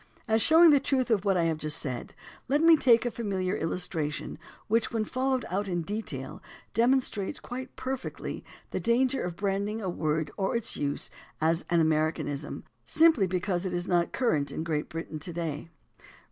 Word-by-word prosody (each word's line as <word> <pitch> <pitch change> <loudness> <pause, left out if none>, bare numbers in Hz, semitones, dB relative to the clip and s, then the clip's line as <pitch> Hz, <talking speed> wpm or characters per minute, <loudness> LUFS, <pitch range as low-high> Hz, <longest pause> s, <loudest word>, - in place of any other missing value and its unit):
As 220 0 +3
showing 325 +4 +7
the 285 - +6
truth 260 -2 0
of 210 -2 +2
what 195 -2 +3
I 170 - +2
have 160 -2 0
just 155 -1 0
said 125 -4 -5 0.3
let 290 +4 +2
me 330 0 +8
take 245 -5 +4
a 240 - 0
familiar 195 -4 -2
illustration 160 -3 -3 0.3
which 225 +1 +1
when 225 -2 -1
followed 260 +2 -1
out 200 +3 -2
in 175 -2 -1
detail 210 +6 -5 0.3
demonstrates 235 -4 +1
quite 255 +2 -7
perfectly 260 0 -5 0.3
the - - -2
danger 255 +3 +2
of 175 -1 -4
branding 200 +3 -1
a 190 -4 -2
word 155 -2 -1
or 195 +3 0
its 235 - +1
use 145 -1 -2 0.3
as 165 +2 +1
an 170 -1 +3
"Americanism," 155 -2 -1 0.2
simply 315 - +4
because 180 0 -1
it 185 -2 -2
is 175 +1 -2
not 175 -1 +2
current 155 - 0
in 160 - -3
Great 155 -2 -2
Britain 165 -2 -6
to 165 +4 -5
day. 165 -2 -4
190 Hz, 175 wpm, -28 LUFS, 165-235 Hz, 0.3 s, me